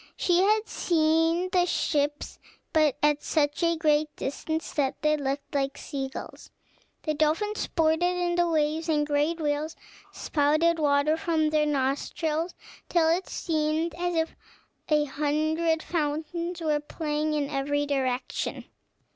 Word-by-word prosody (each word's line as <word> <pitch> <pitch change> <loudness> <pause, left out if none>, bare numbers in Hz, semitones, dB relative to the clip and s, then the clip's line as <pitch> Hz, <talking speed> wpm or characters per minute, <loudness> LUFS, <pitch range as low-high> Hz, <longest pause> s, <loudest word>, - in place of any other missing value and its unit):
She 350 -1 +2
had 425 +3 +3
seen 325 0 +2
the 355 -1 +3
ships, 290 -3 -1 0.3
but 305 -3 +3
at 295 0 +3
such 295 0 0
a 335 0 +3
great 305 -1 +2
distance 315 +3 -3
that 275 -2 0
they 305 0 +4
looked 280 -1 -3
like 275 -1 -1
sea 270 -3 -4
gulls. - - -9 0.5
The 310 - 0
dolphins 320 +8 0
sported 320 0 +1 0.2
in 350 -1 0
the 345 0 +2
waves, 315 +1 0
and 300 -2 +3
the 295 - -6
great 300 +4 +1
whales 300 +1 -1 0.4
spouted 310 +3 +1
water 290 +1 +3
from 320 -4 +1
their 305 -1 +2
nostrils 300 +4 -1 0.3
till 330 -2 +3
it 350 +3 0
seemed 315 0 -1
as 350 0 -2
if 320 0 -1 0.5
a 300 -1 +3
hundred 310 +3 0
fountains 335 +2 -2
were 305 -2 +1
playing 300 0 -2
in 290 -2 0
every 290 +1 -1
direction. 260 -3 -2
310 Hz, 140 wpm, -27 LUFS, 290-330 Hz, 0.5 s, they